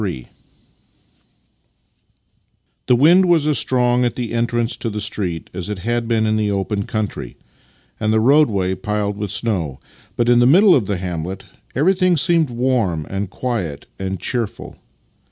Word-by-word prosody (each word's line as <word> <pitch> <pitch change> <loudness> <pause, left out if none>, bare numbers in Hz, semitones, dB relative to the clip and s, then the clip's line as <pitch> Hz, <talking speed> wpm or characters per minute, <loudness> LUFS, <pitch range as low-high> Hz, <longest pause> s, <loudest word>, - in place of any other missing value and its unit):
III 80 -11 -4 2.6
The 125 - +5
wind 170 +9 +5
was 165 -4 +3
as 150 -2 +2
strong 125 -1 +1
at 120 -1 -1
the 120 -3 -4
entrance 120 0 0
to 115 - -3
the 105 0 -4
street 95 -5 -4
as 90 +2 -5
it 105 - -3
had 120 +5 -2
been 115 -1 +1
in 110 0 +1
the 105 -1 0
open 100 +1 -2
country, 110 -2 -4 0.6
and 110 0 0
the 110 - +3
roadway 110 -8 +3
piled 105 +1 -2
with 105 -1 -4
snow, 95 - -2 0.4
but 120 - 0
in 120 0 +5
the 120 - +5
middle 185 +7 +6
of 115 - +2
the 100 - -1
hamlet 90 +1 -5 0.3
everything 185 +4 +2
seemed 160 0 +2
warm 120 - 0
and 100 0 -3
quiet 100 - -4
and 95 0 -4
cheerful. 120 -5 -4
110 Hz, 155 wpm, -19 LUFS, 95-125 Hz, 2.6 s, middle